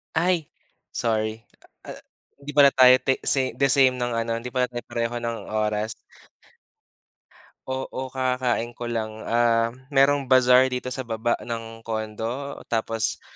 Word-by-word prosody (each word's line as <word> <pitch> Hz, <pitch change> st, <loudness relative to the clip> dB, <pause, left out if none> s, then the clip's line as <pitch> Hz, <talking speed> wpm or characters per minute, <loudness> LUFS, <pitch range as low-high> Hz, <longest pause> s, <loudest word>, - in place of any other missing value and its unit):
Ay, 170 Hz, -1 st, +1 dB, 0.4 s
sorry, 110 Hz, 0 st, -2 dB, 0.4 s
ah, -, -, -6 dB, 0.4 s
hindi 140 Hz, +1 st, -9 dB
pala 145 Hz, -1 st, +7 dB
tayo 130 Hz, -1 st, +8 dB
te 135 Hz, -, +1 dB
se 130 Hz, -2 st, +1 dB
the 140 Hz, -1 st, +2 dB
same 130 Hz, -2 st, +4 dB
ng 120 Hz, -1 st, -2 dB
ano 115 Hz, 0 st, -1 dB
hindi 120 Hz, +2 st, -6 dB
pala 125 Hz, 0 st, +1 dB
tayo 120 Hz, -1 st, -7 dB
pareho 115 Hz, 0 st, -3 dB
ng 115 Hz, -1 st, -4 dB
oras. 105 Hz, 0 st, -1 dB, 1.8 s
Oo, 130 Hz, 0 st, -4 dB
kakakain 125 Hz, -2 st, -1 dB
ko 120 Hz, +1 st, -6 dB
lang, 110 Hz, -1 st, -4 dB
ah, 115 Hz, 0 st, +2 dB, 0.2 s
merong 140 Hz, +1 st, +4 dB
bazaar 130 Hz, 0 st, +5 dB
dito 125 Hz, -1 st, -3 dB
sa 130 Hz, 0 st, -5 dB
baba 115 Hz, +1 st, -1 dB
ng 115 Hz, -1 st, -7 dB
condo, 115 Hz, +5 st, -4 dB
tapos 115 Hz, -1 st, -1 dB
120 Hz, 140 wpm, -24 LUFS, 115-130 Hz, 1.8 s, tayo